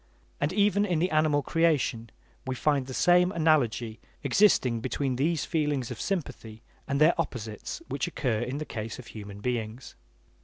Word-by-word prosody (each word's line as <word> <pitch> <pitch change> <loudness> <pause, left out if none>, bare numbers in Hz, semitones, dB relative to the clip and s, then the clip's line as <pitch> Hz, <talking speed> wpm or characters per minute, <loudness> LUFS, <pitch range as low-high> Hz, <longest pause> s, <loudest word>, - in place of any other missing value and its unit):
And 145 +2 0
even 205 +1 +3
in 180 -5 0
the 180 +4 +1
animal 155 -2 +2
creation 145 -9 +1 0.4
we 130 - -1
find 140 -1 +1
the 130 - -6
same 180 +1 +4
analogy 120 - +1 0.2
existing 130 - +3
between 130 +2 -2
these 155 +5 0
feelings 150 -6 -1
of - - -6
sympathy 130 - -4 0.2
and 140 - 0
their 155 +3 +6
opposites 110 - -6
which - - -2
occur 125 -10 -1
in 125 +4 -3
the 155 - -4
case 110 -3 -5
of 125 - -10
human 100 -3 -9
beings. 120 +1 -4
140 Hz, 160 wpm, -28 LUFS, 115-165 Hz, 0.4 s, their